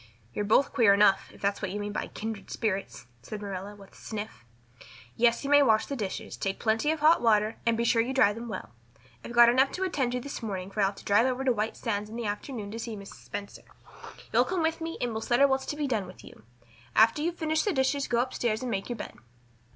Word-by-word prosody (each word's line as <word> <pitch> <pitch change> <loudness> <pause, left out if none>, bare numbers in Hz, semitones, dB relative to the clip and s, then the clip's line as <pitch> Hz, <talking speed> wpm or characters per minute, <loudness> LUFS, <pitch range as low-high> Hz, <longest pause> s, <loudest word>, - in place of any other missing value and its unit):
"You're 205 - -2
both 220 +7 +3
queer 225 -7 +5
enough, 200 -1 +4
if - - -17
that's 200 0 0
what 190 - -2
you 205 +3 -4
mean 205 0 -4
by 210 - -3
kindred 220 -2 -6
spirits," 195 - -3 0.2
said 210 - -7
Marilla 200 0 -6
with 200 -1 -15
a - - -19
sniff. 215 - -7 0.7
"Yes, 235 +2 +2
you 280 - -3
may 290 0 +7
wash 220 -5 +4
the 280 - -4
dishes. 205 -7 -5
Take 195 0 -3
plenty 225 +6 +1
of 315 -1 -1
hot 315 +2 +5
water, 215 -2 +2
and 230 -1 +3
be 235 - 0
sure 230 0 +3
you 240 +3 -2
dry 255 -6 +4
them 230 +2 -7
well. 115 - -6 0.5
I've - - -8
got 240 0 +7
enough 260 +3 +4
to 375 - -2
attend 280 -10 -1
to 250 - -1
this 280 +1 -7
morning 195 -4 -5
for 210 - -6
I'll 195 - +4
have 195 - -4
to - - -14
drive 210 +5 +4
over 260 +1 -1
to 260 -2 +3
White 220 0 -2
Sands 210 -3 -3
in 220 - -9
the 235 -1 -4
afternoon 210 0 -4
and 230 +1 -5
see 230 -2 -5
Mrs. 200 0 -10
Spencer. 205 0 -7 0.7
You'll - - +5
come 365 -3 -1
with 325 +1 0
me 330 0 -4
and 245 - -1
we'll 220 0 -4
settle 245 +5 +4
what's 265 -1 -1
to - - -3
be 295 -1 -2
done 220 -8 -1
with 185 - -13
you. - - -14 0.5
After 225 +6 +5
you've 340 +2 -2
finished 315 -1 0
the 415 - +2
dishes 275 -1 0
go 235 0 +2
up 255 +1 -3
stairs 230 0 -1
and 250 - -3
make 195 +1 -3
your 240 - -3
bed." - - -7
230 Hz, 255 wpm, -28 LUFS, 205-265 Hz, 0.7 s, may